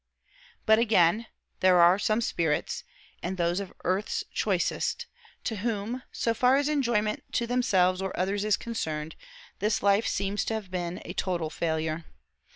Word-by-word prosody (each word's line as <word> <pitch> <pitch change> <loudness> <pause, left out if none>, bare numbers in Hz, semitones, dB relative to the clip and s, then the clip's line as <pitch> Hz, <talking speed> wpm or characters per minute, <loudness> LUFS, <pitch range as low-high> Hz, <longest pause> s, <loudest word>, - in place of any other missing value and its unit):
But 220 0 +5
again: 215 -1 +3 0.3
there 185 -1 +5
are 175 +3 +6
some 215 +2 +1
spirits 165 -8 -1 0.4
(and 185 +2 -3
those 175 +1 +1
of 195 -2 -6
earth's 185 +4 0
choicest) - - 0 0.4
to 220 - -2
whom, 225 +3 -2
so 230 - 0
far 250 +3 +4
as 280 +1 +2
enjoyment 235 -8 +1
to 235 - +1
themselves 190 -7 +2
or 190 -1 -2
others 195 +2 0
is 210 -1 +2
concerned, 160 -9 -4 0.4
this 210 -1 0
life 200 +2 +3
seems 200 +1 -1
to 225 - -1
have 205 -4 -6
been 175 -1 -3
a 175 - -6
total 175 -5 -2
failure. 160 -1 -2
200 Hz, 155 wpm, -28 LUFS, 175-225 Hz, 0.4 s, are